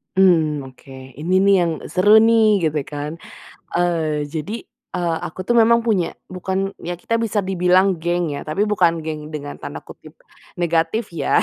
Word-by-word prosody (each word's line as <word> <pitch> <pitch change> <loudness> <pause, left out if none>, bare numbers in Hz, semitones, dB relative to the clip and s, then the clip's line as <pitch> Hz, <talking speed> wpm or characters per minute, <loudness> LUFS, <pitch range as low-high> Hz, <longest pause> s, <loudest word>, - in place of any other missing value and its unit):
Mmm, 160 -7 +3
oke. 130 +1 -16 0.2
Ini 170 +6 -1
nih 200 +1 +5
yang 170 - 0 0.2
seru 205 +4 +5
nih, 220 -2 +4
gitu 150 -2 -2
kan. 150 +2 -6 0.6
Eee, 165 -4 0
jadi, 165 +9 -5 0.3
eee, 170 -2 0
aku 185 +3 -7
tuh 240 +4 +2
memang 235 +1 +5
punya 200 -7 0 0.2
bukan, 190 +1 -2
ya 175 +1 -5
kita 230 +7 -2
bisa 215 -3 0
dibilang 185 0 +2
geng 175 0 -1
ya, 145 - -6
tapi 155 +7 -1
bukan 170 -6 +2
geng 155 -1 -6
dengan 145 -1 -6
tanda - - -7
kutip - - -14 0.4
negatif 170 +5 0
ya. 170 - +1
175 Hz, 165 wpm, -20 LUFS, 160-200 Hz, 0.6 s, nih